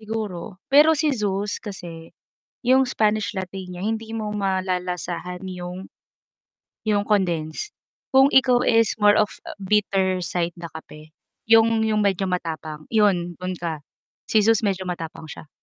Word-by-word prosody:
Siguro, 210 -4 -5 0.2
pero 305 +3 +7
si 300 0 +1
Zeus 205 -3 -2
kasi, 170 -5 -9 0.5
yung 260 +1 +6
Spanish 215 -4 0
Latte 190 -1 -5
niya 180 -1 -9
hindi 220 +3 -3
mo 220 -1 -3
malalasahan 180 -2 -2
yung 180 +1 -7 1.0
yung 210 -1 +2
condense. 175 - 0 0.4
Kung 265 +1 +7
ikaw 255 -3 +4
is 230 -3 +3
more 205 0 +6
of 215 0 +2 0.2
a - - -9
bitter 195 -2 +1
side 175 0 -2
na 170 -1 -9
kape, 155 -1 -12 0.4
yung 225 0 +5
yung 215 -1 +1
medyo 195 -1 0
matapang 160 -3 -4
yun, 190 -5 +2
dun 185 0 -3
ka. 165 -3 -4 0.5
Si 215 -2 +4
Zeus 225 -1 +4
medyo 195 -3 -1
matapang 165 -3 -6
siya. 155 0 -10
195 Hz, 140 wpm, -23 LUFS, 180-220 Hz, 1.0 s, pero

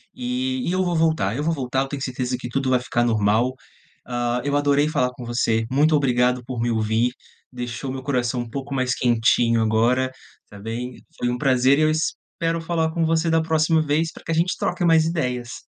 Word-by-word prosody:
e 255 +1 -2
e - - +1
eu 185 0 +1
vou 175 -1 -1
voltar 155 -11 +1
eu 145 - -2
vou 165 +1 +1
voltar, 130 -2 -1
eu 135 - -2
tenho 140 -1 -6
certeza 125 -1 -2
que 120 - -6
tudo 135 0 -1
vai 125 - +4
ficar 120 -1 -1
normal, 110 +2 +2 0.5
hã, 120 0 -1
eu 145 0 -1
adorei 145 +1 +2
falar 125 -4 0
com 125 -1 -10
você, 115 -1 0
muito 150 +3 +3
obrigado 125 -2 +2
por 125 -1 -6
me 120 0 0
ouvir, 110 +2 +1 0.4
deixou 125 +1 -5
meu 130 0 -5
coração 125 -2 -1
um 120 - -7
pouco 140 +2 -5
mais 130 -1 0
quentinho 115 -1 +2
agora, 120 +4 +2 0.3
está 105 - -14
bem? 120 +4 -6
Foi 120 - 0
um 125 - -1
prazer, 130 0 +3
e - - +2
eu 155 - +3
espero 165 +1 -2
falar 165 -1 -1
com 165 0 0
você 165 +1 +1
da 160 0 +2
próxima 160 0 +2
vez, 155 +2 0
para - - -14
que 165 - -4
a - - +1
gente 170 +3 +1
troque 175 0 -2
mais 165 -2 +4
ideias. 125 -7 -3
130 Hz, 215 wpm, -22 LUFS, 120-160 Hz, 0.5 s, vai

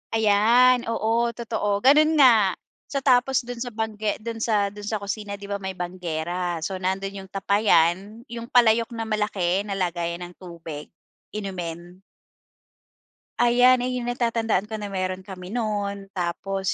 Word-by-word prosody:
Ayan. 225 +4 +4
Oo, 230 +1 0
totoo, 215 -3 -2
gano'n 305 +4 +5
nga. 225 - +5 0.3
So, 275 -2 -3
tapos 255 -1 +3
do'n 245 0 -7
sa 245 - -4
bangge 215 -1 -2
do'n 230 0 -5
sa 210 -3 +1
do'n 205 0 -9
sa 220 - -1
kusina 200 0 -4
'di 200 0 -10
ba, 200 - -2
may 190 -1 -5
banggera. 175 -1 -3
So 190 +2 -3
nando'n 190 +1 -2
'yong 190 - -10
tapayan, 195 +1 +1
'yong 235 0 -6
palayok 230 -2 +4
na 225 - -3
malaki 210 -3 -1
na 200 - -3
lagayan 175 -2 -2
ng 175 0 -9
tubig, 165 -4 -8 0.5
inumin. 180 -3 -6 1.4
Ayan, 245 +1 +5
iyong 250 -1 -2
natatandaan 230 -4 0
ko 215 0 -6
na 205 - -5
meron 185 -1 -3
kami 185 0 -9
noon. 205 -4 -3
Tapos 190 +2 -2
205 Hz, 145 wpm, -24 LUFS, 185-230 Hz, 1.4 s, gano'n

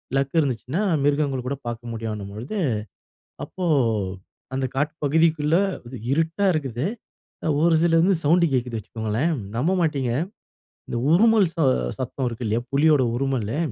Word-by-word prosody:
Luck 135 +3 0
இருந்துச்சுன்னா, 135 - -1 0.2
மிருகங்கள் 140 -3 +1
கூட 140 - -1
பார்க்க 120 0 -5
முடியும்ன்னும்பொழுது. 110 - -5 0.9
அப்போ, 185 - -6 0.9
அந்த 130 0 0
காட்டு 145 +2 0
பகுதிக்குள்ளே 160 +2 +3 0.5
இருட்டா 165 +6 0
இருக்குது. 135 -3 -2 0.8
ஒரு 170 -1 +4
சில 165 -1 +3
வந்து 190 +4 +4
சவுண்டு 170 +3 +4
கேட்குது 125 -2 -1
வச்சுக்கோங்களேன். 110 - -2 0.2
நம்ப 155 +10 +1
மாட்டங்க 140 -7 0 0.8
இந்த - - -3
உறுமல் 220 +3 +5
ச - - -35 0.4
சத்தம் 130 +1 -3
இருக்கு 120 0 -5
இல்லையா, 110 +2 0
புலியோட 145 0 +4
உறுமல்லு. 130 -2 -1
140 Hz, 125 wpm, -23 LUFS, 120-160 Hz, 0.9 s, உறுமல்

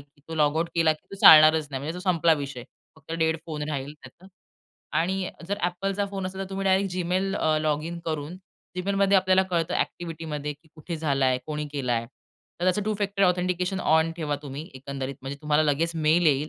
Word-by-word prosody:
की 140 0 -22
तो 165 - -5
लॉगआउट 155 +2 +1
केला 165 -2 +4
की 155 - -15
तो - - -10
चालणारच 155 -1 +8
नाही. 135 -1 -4
म्हणजे 155 +4 -4
तो - - -7
संपला 165 -1 +3
विषय. 135 -3 -7 0.3
फक्त 155 +1 -11
डेड 160 -1 +1
फोन 150 -2 -5
राहील 140 -1 -4
त्याचा 135 +8 -15 0.7
आणि 185 +3 0
अ, - - -7 0.2
जर 200 - -1
Appleचा 195 +3 -2
फोन 195 -1 -3
असेल 190 +1 -6
तर 195 - -4
तुम्ही 195 0 -3
डायरेक्ट 190 0 +2
जीमेल 185 +2 -1
अ, 155 -1 +2
लॉगिन 155 +3 -1
करून 155 +1 -4 0.4
जीमेलमध्ये 195 +1 +2
आपल्याला 190 0 +4
कळतं 170 -2 0
ॲक्टिव्हिटीमध्ये 155 -3 -3
की 150 +3 -22
कुठे 165 +2 -6
झालाय? 135 -5 +1
कोणी 150 -1 -3
केलाय? 125 -5 -1 0.6
तर - - 0
त्याचं 185 +3 +2
टू 215 +1 -1
फॅक्टर 200 -1 -1
ऑथेंटिकेशन 180 +1 +1
ऑन 160 0 +3
ठेवा 150 -3 -2
तुम्ही 145 +3 -7
एकंदरीत, 135 0 -5
म्हणजे 135 +1 -5
तुम्हाला 150 +1 +2
लगेच 155 +3 +1
मेल 160 +2 +3
येईल 150 +1 +2
160 Hz, 195 wpm, -26 LUFS, 150-185 Hz, 0.7 s, चालणारच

